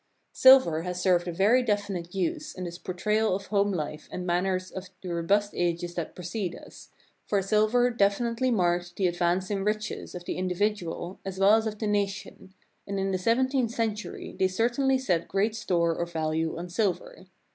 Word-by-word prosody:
Silver 260 Hz, -12 st, +6 dB
has 180 Hz, +1 st, -4 dB
served 180 Hz, -2 st, +2 dB
a -, -, -1 dB
very 205 Hz, +9 st, +4 dB
definite 200 Hz, -6 st, -2 dB
use 305 Hz, -, -2 dB
in 185 Hz, -, -6 dB
this 175 Hz, 0 st, -6 dB
por 185 Hz, -, -6 dB
trayal 210 Hz, +2 st, +1 dB
of 195 Hz, -, -5 dB
home 205 Hz, -1 st, +1 dB
life 155 Hz, -3 st, -4 dB
and 180 Hz, -, -5 dB
manners 185 Hz, +1 st, 0 dB
of 190 Hz, 0 st, -7 dB
the 180 Hz, -2 st, -4 dB
robust 200 Hz, +5 st, +1 dB
ages 175 Hz, 0 st, -1 dB
that 170 Hz, -3 st, -5 dB
precede 180 Hz, +1 st, -4 dB
us, -, -, -13 dB, 0.4 s
for 205 Hz, -, +2 dB
silver 215 Hz, +5 st, +3 dB
definitely 230 Hz, +4 st, +1 dB
marked 175 Hz, -5 st, 0 dB
the 190 Hz, -, +1 dB
ad 175 Hz, -, -2 dB
vance 180 Hz, +2 st, 0 dB
in 195 Hz, -1 st, -1 dB
riches 215 Hz, -1 st, -3 dB
of 175 Hz, 0 st, -7 dB
the -, -, -3 dB
individual 185 Hz, -1 st, -2 dB
as 195 Hz, -1 st, -6 dB
well 195 Hz, +2 st, +5 dB
as 220 Hz, 0 st, +3 dB
of 215 Hz, -1 st, -4 dB
the 215 Hz, -, -3 dB
nation, 200 Hz, -2 st, -3 dB, 0.3 s
and 200 Hz, 0 st, -2 dB
in 195 Hz, 0 st, 0 dB
the 185 Hz, -, -1 dB
seventeenth 255 Hz, +4 st, +2 dB
century 220 Hz, -2 st, -4 dB
they 190 Hz, -, +4 dB
certainly 240 Hz, +7 st, +1 dB
set 180 Hz, -11 st, 0 dB
great 210 Hz, +3 st, 0 dB
store 175 Hz, -6 st, +1 dB
or 170 Hz, -, -2 dB
value 160 Hz, -1 st, -2 dB
on 175 Hz, +1 st, -5 dB
silver. 185 Hz, -1 st, -2 dB
195 Hz, 190 wpm, -27 LUFS, 175-215 Hz, 0.4 s, Silver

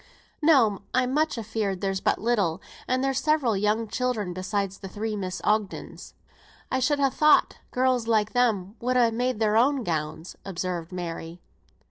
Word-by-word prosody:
"No, 255 Hz, -11 st, +4 dB
I'm 255 Hz, 0 st, +2 dB
much 310 Hz, -1 st, +1 dB
afeared 215 Hz, -3 st, -2 dB
there's 195 Hz, -1 st, -1 dB
but -, -, +2 dB
little, 200 Hz, -7 st, 0 dB, 0.3 s
and 255 Hz, +1 st, +1 dB
there's 270 Hz, -1 st, +1 dB
several 295 Hz, -7 st, +2 dB
young 210 Hz, +3 st, 0 dB
children, 220 Hz, -6 st, -2 dB
besides 195 Hz, +1 st, -3 dB
the 195 Hz, -, -7 dB
three 215 Hz, +3 st, -4 dB
Miss 185 Hz, -3 st, -4 dB
Ogdens." 210 Hz, -2 st, -2 dB, 0.6 s
"I 260 Hz, -, +1 dB
should 285 Hz, +3 st, +2 dB
have 275 Hz, -2 st, +1 dB
thought 305 Hz, -1 st, +4 dB
girls 250 Hz, -2 st, +1 dB
like 215 Hz, -2 st, +1 dB
them 220 Hz, -5 st, +1 dB
would 255 Hz, +1 st, +1 dB
ha' 235 Hz, -2 st, +4 dB
made 245 Hz, -1 st, -1 dB
their 215 Hz, -1 st, +2 dB
own 265 Hz, +2 st, +3 dB
gowns," 160 Hz, -1 st, -3 dB
observed 180 Hz, -3 st, -4 dB
Mary. 170 Hz, -1 st, -6 dB
220 Hz, 160 wpm, -26 LUFS, 190-255 Hz, 0.6 s, No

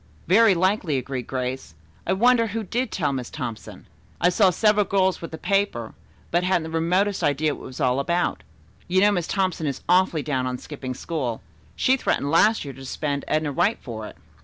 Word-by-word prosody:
"Very 200 Hz, +2 st, +5 dB
likely," 185 Hz, -4 st, +1 dB
agreed 130 Hz, -1 st, -4 dB
Grace. 130 Hz, -9 st, -4 dB, 0.3 s
"I 190 Hz, -, +2 dB
wonder 235 Hz, +3 st, +4 dB
who 225 Hz, +2 st, -3 dB
did 245 Hz, +6 st, -2 dB
tell 145 Hz, -6 st, -1 dB
Miss 125 Hz, -3 st, -4 dB
Thompson. 125 Hz, -7 st, -7 dB, 0.3 s
I 175 Hz, -, +4 dB
saw 190 Hz, +2 st, +4 dB
several 210 Hz, +3 st, +3 dB
girls 190 Hz, -1 st, +1 dB
with 165 Hz, -, -6 dB
the 160 Hz, -, -7 dB
paper, 195 Hz, -, -1 dB, 0.4 s
but 175 Hz, +1 st, +2 dB
hadn't 180 Hz, -2 st, +1 dB
the 160 Hz, -, -7 dB
remotest 180 Hz, +5 st, +1 dB
idea 145 Hz, +1 st, +1 dB
what -, -, -10 dB
it -, -, -8 dB
was 130 Hz, +2 st, -10 dB
all 130 Hz, -2 st, +2 dB
about. 170 Hz, +5 st, 0 dB, 0.5 s
You 185 Hz, +1 st, +2 dB
know 205 Hz, +1 st, +5 dB
Miss 175 Hz, -4 st, -1 dB
Thompson 185 Hz, -5 st, -1 dB
is 135 Hz, -2 st, -4 dB
awfully 180 Hz, -4 st, +3 dB
down 130 Hz, -4 st, -1 dB
on 125 Hz, 0 st, -3 dB
'skipping 130 Hz, -2 st, -7 dB
school.' 130 Hz, -7 st, -4 dB, 0.3 s
She 260 Hz, +1 st, +3 dB
threatened 140 Hz, -, -1 dB
last 210 Hz, +3 st, +4 dB
year 140 Hz, -, -6 dB
to 135 Hz, +1 st, -12 dB
suspend 140 Hz, +1 st, -3 dB
Edna 155 Hz, -1 st, 0 dB
Wright 175 Hz, +10 st, +1 dB
for 110 Hz, -3 st, -7 dB
it." -, -, -13 dB
165 Hz, 200 wpm, -24 LUFS, 135-190 Hz, 0.5 s, Very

